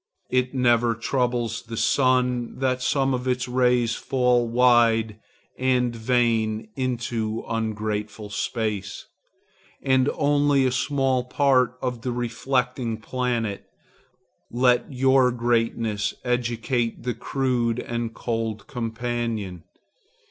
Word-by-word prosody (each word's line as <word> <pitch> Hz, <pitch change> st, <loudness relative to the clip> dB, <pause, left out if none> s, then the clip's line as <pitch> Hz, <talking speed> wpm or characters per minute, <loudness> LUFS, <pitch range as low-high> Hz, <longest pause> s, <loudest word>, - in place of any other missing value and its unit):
It 130 Hz, +1 st, +1 dB
never 120 Hz, -2 st, +3 dB
troubles 120 Hz, -1 st, -1 dB
the 115 Hz, -1 st, -8 dB
sun 125 Hz, -2 st, +1 dB
that 130 Hz, -1 st, 0 dB
some 135 Hz, +1 st, +1 dB
of 125 Hz, 0 st, -2 dB
his 125 Hz, -1 st, 0 dB
rays 125 Hz, -2 st, +2 dB
fall 125 Hz, -2 st, +1 dB
wide 115 Hz, -3 st, +3 dB, 0.4 s
and 125 Hz, -2 st, +1 dB
vain 115 Hz, -2 st, 0 dB
into 120 Hz, -4 st, -2 dB
ungrateful 110 Hz, -2 st, -3 dB
space, 105 Hz, -2 st, -3 dB, 0.7 s
and 130 Hz, 0 st, +2 dB
only 145 Hz, -2 st, +3 dB
a 130 Hz, -, +2 dB
small 130 Hz, -1 st, +1 dB
part 130 Hz, -2 st, +2 dB
on 125 Hz, -2 st, -2 dB
the 125 Hz, -, -2 dB
reflecting 120 Hz, 0 st, -1 dB
planet. 115 Hz, -3 st, -2 dB, 0.8 s
Let 125 Hz, +2 st, +2 dB
your 130 Hz, -1 st, +4 dB
greatness 115 Hz, -3 st, 0 dB
educate 120 Hz, -1 st, -1 dB
the 125 Hz, 0 st, -1 dB
crude 125 Hz, -4 st, -1 dB
and 120 Hz, -2 st, -3 dB
cold 115 Hz, -3 st, -3 dB
companion. 115 Hz, -6 st, -4 dB
120 Hz, 105 wpm, -24 LUFS, 115-125 Hz, 0.8 s, your